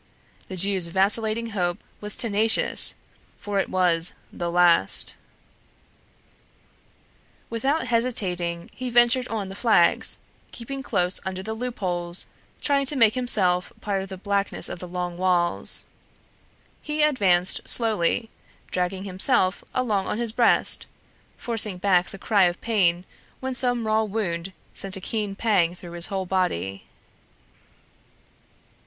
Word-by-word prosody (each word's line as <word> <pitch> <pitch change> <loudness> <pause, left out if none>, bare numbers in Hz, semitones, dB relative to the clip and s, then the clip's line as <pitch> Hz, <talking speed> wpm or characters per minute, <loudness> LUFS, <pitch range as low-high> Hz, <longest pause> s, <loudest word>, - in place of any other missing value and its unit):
The 190 - -7
Jew's 190 -1 +3
vacillating 215 +5 +1
hope 175 -4 -2 0.2
was 210 -1 -1
tenacious, 220 -1 +4 0.4
for 205 -1 -3
it - - -2
was 175 -2 +1 0.2
the 175 - -4
last. 175 -1 +3 2.4
Without 270 +7 -1
hesitating, 185 -8 -1
he 255 0 -5
ventured 240 +1 +3
on 215 -3 -4
the 190 - -8
flags, 200 -5 +2 0.3
keeping 270 +3 -7
close 180 -7 -1
under 190 0 -5
the 220 +2 -4
loopholes, 185 -7 -2 0.4
trying 280 -2 +1
to 295 - +3
make 225 -5 +4
himself 190 -8 +2
part 200 -2 -2
of 190 - -8
the 190 - -7
blackness 200 +1 0
of - - -7
the 180 - -7
long 175 0 -5
walls. 180 -2 +2 1.0
He 300 0 -1
advanced 190 -12 +2
slowly, 225 -1 +1 0.4
dragging 185 +1 -2
himself 185 -1 +1
along 215 -7 -1
on - - -3
his 235 -1 -1
breast, 235 0 +2 0.5
forcing 220 -5 0
back 180 -1 +2
the - - -6
cry 200 -1 +2
of 175 0 -1
pain 185 -6 +1 0.3
when 260 0 -4
some 245 -2 -1
raw 215 0 +2
wound 195 -5 -3 0.2
sent 195 -1 0
a - - -6
keen 205 0 -3
pang 190 -6 +1
through 175 -1 -11
his 170 0 +2
whole 195 -2 -3
body. 100 - -2
195 Hz, 130 wpm, -24 LUFS, 180-230 Hz, 2.4 s, tenacious